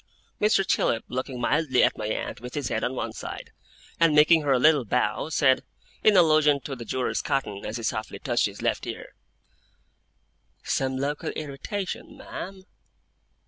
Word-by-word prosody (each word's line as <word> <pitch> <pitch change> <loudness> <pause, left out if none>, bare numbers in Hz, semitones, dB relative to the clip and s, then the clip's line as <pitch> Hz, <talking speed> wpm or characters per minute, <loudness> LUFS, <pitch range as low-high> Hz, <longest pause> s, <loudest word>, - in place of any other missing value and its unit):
Mr. 210 -2 +3
Chillip, 115 -10 +1
looking 130 0 -4
mildly 130 0 +2
at - - +3
my 105 - -4
aunt 110 - -4
with 125 +1 -8
his 145 -5 -2
head 110 - -1
on 130 - -1
one 115 -2 -3
side, - - -7 0.5
and 165 -3 +4
making 155 +2 +6
her 145 -2 0
a 130 - +5
little 150 +1 +5
bow, 115 +3 0
said, 135 -5 +3 0.4
in 210 -2 +6
allusion 155 -4 +5
to 135 0 -6
the 120 - -8
jewellers' 130 +3 -1
cotton, 135 -9 -2
as 105 +3 -4
he 115 - -7
softly 110 -1 -3
touched - - +1
his - - -9
left - - -1
ear: - - -7 1.5
'Some 130 -1 -1
local 145 +2 -2
irritation, 155 +7 -5
ma'am? 190 0 -8
135 Hz, 165 wpm, -26 LUFS, 125-155 Hz, 1.5 s, making